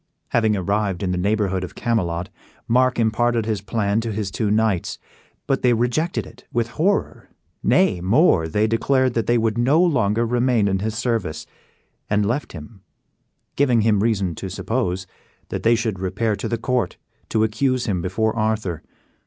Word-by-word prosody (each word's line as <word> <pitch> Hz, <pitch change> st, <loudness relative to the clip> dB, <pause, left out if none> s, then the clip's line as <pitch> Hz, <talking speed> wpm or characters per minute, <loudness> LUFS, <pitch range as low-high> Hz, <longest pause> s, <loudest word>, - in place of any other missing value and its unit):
Having 110 Hz, -2 st, +2 dB
arrived 100 Hz, 0 st, -1 dB
in 90 Hz, -, 0 dB
the 90 Hz, -, -1 dB
neighborhood 100 Hz, -1 st, 0 dB
of 90 Hz, -, -7 dB
Camelot, 90 Hz, -7 st, -1 dB, 0.4 s
Mark 125 Hz, +2 st, +3 dB
imparted 115 Hz, 0 st, +1 dB
his 110 Hz, -3 st, -2 dB
plan 105 Hz, 0 st, 0 dB
to 115 Hz, 0 st, -3 dB
his 100 Hz, -2 st, -3 dB
two 105 Hz, +3 st, -1 dB
knights, 105 Hz, -4 st, +1 dB, 0.5 s
but 135 Hz, -, 0 dB
they 125 Hz, -1 st, +4 dB
rejected 125 Hz, +9 st, 0 dB
it 125 Hz, +2 st, -15 dB
with 120 Hz, -1 st, 0 dB
horror; 190 Hz, +11 st, -1 dB, 0.3 s
nay, 145 Hz, -, +3 dB
more, 95 Hz, -, +3 dB
they 105 Hz, +7 st, +1 dB
declared 130 Hz, +3 st, +1 dB
that 115 Hz, -1 st, -1 dB
they 120 Hz, -, +3 dB
would 115 Hz, 0 st, 0 dB
no 135 Hz, +7 st, +3 dB
longer 120 Hz, -, +2 dB
remain 120 Hz, -2 st, +2 dB
in 95 Hz, -1 st, 0 dB
his 110 Hz, +2 st, -3 dB
service; 110 Hz, -10 st, -2 dB, 0.6 s
and 105 Hz, 0 st, +2 dB
left 120 Hz, +8 st, -2 dB
him, 95 Hz, +5 st, -11 dB, 0.7 s
giving 125 Hz, -5 st, +3 dB
him 105 Hz, -2 st, +3 dB
reason 100 Hz, -6 st, +1 dB
to 95 Hz, +4 st, -6 dB
suppose 95 Hz, -2 st, -2 dB, 0.4 s
that -, -, -3 dB
they 115 Hz, +1 st, +4 dB
should 110 Hz, -4 st, -2 dB
repair 105 Hz, +4 st, -1 dB
to -, -, -4 dB
the 115 Hz, -, -1 dB
court 125 Hz, -4 st, -1 dB, 0.3 s
to 110 Hz, -1 st, +2 dB
accuse 125 Hz, +3 st, 0 dB
him 95 Hz, -7 st, -1 dB
before 110 Hz, +5 st, -1 dB
Arthur. 110 Hz, -6 st, -1 dB
110 Hz, 170 wpm, -22 LUFS, 100-120 Hz, 0.7 s, they